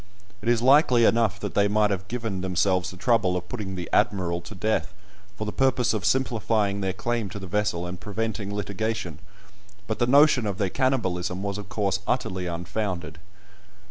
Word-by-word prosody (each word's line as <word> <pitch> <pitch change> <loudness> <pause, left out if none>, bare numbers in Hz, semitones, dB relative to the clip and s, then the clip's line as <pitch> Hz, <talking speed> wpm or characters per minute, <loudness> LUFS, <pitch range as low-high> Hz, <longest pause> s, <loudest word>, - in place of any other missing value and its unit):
It 115 - -1
is 120 -1 +2
likely 130 -3 +5
enough 110 -4 +2
that 105 - -4
they 100 0 +3
might 105 0 +2
have 95 0 -3
given 110 -5 -3
themselves 95 0 +1
the 95 - -10
trouble 95 -3 +2
of 90 0 -6
putting 100 -4 -5
"the 90 -2 -5
Admiral" 85 -3 +1
to 105 - -10
death, 110 +4 -1 0.4
for 110 - -3
the 105 - -3
purpose 130 -2 +2
of 105 -5 -2
simplifying 110 -6 +1
their 95 -1 0
claim 115 +2 -2
to 100 - -7
the 95 - -7
vessel 95 -2 -1
and 90 0 -6
preventing 105 -1 -3
litigation, 100 -4 -3 0.7
but 110 - -3
the 120 - +2
notion 140 -3 +5
of 100 -2 -3
their 100 -2 0
cannibalism 95 -9 0
was 100 0 -3
of 100 -1 -9
course 100 -2 0
utterly 95 -1 -1
unfounded. 85 -1 -4
100 Hz, 180 wpm, -25 LUFS, 95-115 Hz, 0.7 s, likely